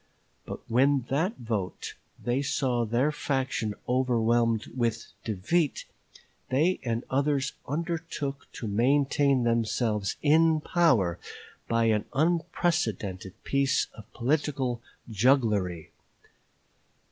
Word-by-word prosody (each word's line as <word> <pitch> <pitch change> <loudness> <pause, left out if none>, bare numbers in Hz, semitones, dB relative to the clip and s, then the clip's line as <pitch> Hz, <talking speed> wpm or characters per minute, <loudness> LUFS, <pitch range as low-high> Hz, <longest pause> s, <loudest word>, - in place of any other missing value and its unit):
But - - -6
when 135 +4 +3
by 120 - -17
that 160 +10 0
vote 110 -6 -4 0.2
they 120 +3 -1
saw 125 -4 0
their 120 +7 +1
faction 130 -7 -2
overwhelmed 120 -3 +2
with 115 -2 -1
defeat, 120 - 0 0.6
they 155 +8 +2
and 115 -1 -2
others 140 0 +1
undertook 160 -3 -4
to 115 - -5
maintain 135 +4 +2
themselves 115 -3 0
in 160 +1 +4
power 130 - +2 0.5
by 115 0 +2
an 110 -2 +2
unprecedented 160 - 0
piece 140 0 +1
of 110 -2 -14
political 130 -2 -1 0.3
jugglery. 105 - +1
130 Hz, 100 wpm, -28 LUFS, 115-145 Hz, 0.6 s, in